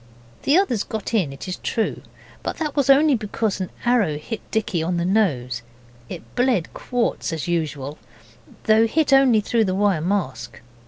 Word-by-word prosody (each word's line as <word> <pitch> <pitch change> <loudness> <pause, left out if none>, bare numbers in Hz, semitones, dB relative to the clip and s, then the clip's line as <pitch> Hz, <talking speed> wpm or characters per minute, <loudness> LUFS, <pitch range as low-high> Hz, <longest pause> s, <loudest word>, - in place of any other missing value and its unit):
The 290 - +3
others 250 - +1
got 220 +1 -5
in, 185 -11 +1
it 135 - -9
is 185 - -4
true, 225 - -2 0.4
but - - -4
that 305 -3 -3
was 280 -2 +1
only 285 +2 +6
because 215 -3 -1
an 185 - -3 0.2
arrow 225 -11 +2
hit 215 +9 -6
Dicky 215 -6 -1
on 175 +2 -1
the 170 - 0
nose, 140 - +1 0.5
and - - -5
it - - -22
bled 245 -8 +1
quarts 245 -6 -2
as 160 -4 -4
usual, 155 -4 -2 0.6
though 220 +1 +4
hit 290 +3 +1
only 260 -5 +5
through 225 +1 +1
the 185 -1 -1
wire 195 -5 +2
mask. 130 - -2
205 Hz, 175 wpm, -22 LUFS, 165-240 Hz, 0.6 s, only